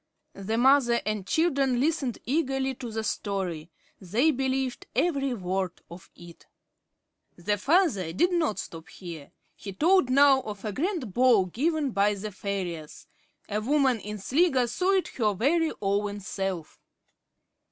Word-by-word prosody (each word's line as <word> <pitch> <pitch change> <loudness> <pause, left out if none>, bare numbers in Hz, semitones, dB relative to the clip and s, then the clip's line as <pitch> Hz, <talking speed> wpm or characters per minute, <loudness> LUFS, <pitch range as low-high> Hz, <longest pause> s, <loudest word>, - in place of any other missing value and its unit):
The 205 +3 -3
mother 245 -1 +4
and 210 -2 -3
children 275 -6 +1
listened 280 -4 0
eagerly 270 -1 0
to 245 -2 -7
the 220 0 -3
story. 185 -7 -3 0.3
They 225 - +2
believed 265 -1 -2
every 275 -7 +1
word 185 -2 -2 0.2
of 175 +1 -12
it. 170 -1 -14 0.9
The 205 +3 -2
father 270 - +2
did 350 - +2
not 320 - 0
stop 160 -1 -8
here. 165 -6 -10 0.2
He 195 - -8
told 330 - +3
now 275 0 +5
of 205 -2 -8
a 210 - -2
grand 305 - -2
ball 240 -5 +4
given 290 - -1
by 205 0 +2
the 210 +2 -6
fairies. 180 -6 -5 0.4
A 210 +1 -2
woman 265 -1 +2
in 210 +1 -6
Sligo 265 - +2
saw 365 +11 0
it 380 -2 +1
her 210 -5 0
very 315 - +2
own 205 +1 -1
self. 190 -4 -5
235 Hz, 140 wpm, -27 LUFS, 195-275 Hz, 0.9 s, now